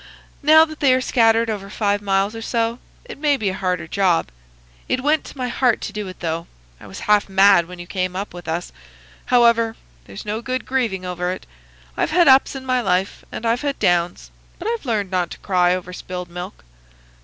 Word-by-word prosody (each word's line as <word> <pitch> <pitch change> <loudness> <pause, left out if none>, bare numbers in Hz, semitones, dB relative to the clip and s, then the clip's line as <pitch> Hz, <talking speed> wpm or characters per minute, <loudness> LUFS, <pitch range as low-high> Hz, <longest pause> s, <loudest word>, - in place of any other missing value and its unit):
Now 315 +2 +7
that 310 -1 -11
they 265 -3 +4
are - - +2
scattered 230 -2 +3
over 200 -3 -4
five 205 -1 0
miles 200 +1 0
or 225 - -6
so, 230 +1 -1 0.3
it 485 - -10
may 290 -2 +2
be 210 -6 -1
a - - -3
harder 180 -3 -2
job. 180 - +1 0.6
It 255 - 0
went 300 +2 +2
to - - -11
my 250 -1 -2
heart 245 -1 +1
to 205 - -5
do 210 -2 -4
it, 185 - -10
though. 165 0 -3 0.3
I - - -13
was 95 - -9
half 210 -1 +2
mad 195 -3 +5
when 180 0 -10
you 175 - -8
came 185 0 -3
up 195 0 -4
with 175 -1 -10
us. 170 +2 -3 0.5
However, 235 -2 +3 0.3
there's 100 - -10
no 215 +2 -3
good 255 +1 -3
grieving 230 -8 -1
over 180 0 -2
it. 185 - -7 0.5
I've - - 0
had 345 -1 +4
ups 265 +1 +5
in 265 -1 -7
my 255 -1 +1
life, 185 -2 -1
and 230 - -6
I've 230 +2 +1
had 285 -2 -2
downs, 175 0 0 0.3
but 370 - -6
I've 460 - -3
learned 205 -5 -1
not 180 -2 0
to - - -9
cry 180 -2 +2
over 180 0 -7
spilled 180 -1 -6
milk." 180 +3 -8
205 Hz, 210 wpm, -21 LUFS, 180-250 Hz, 0.6 s, Now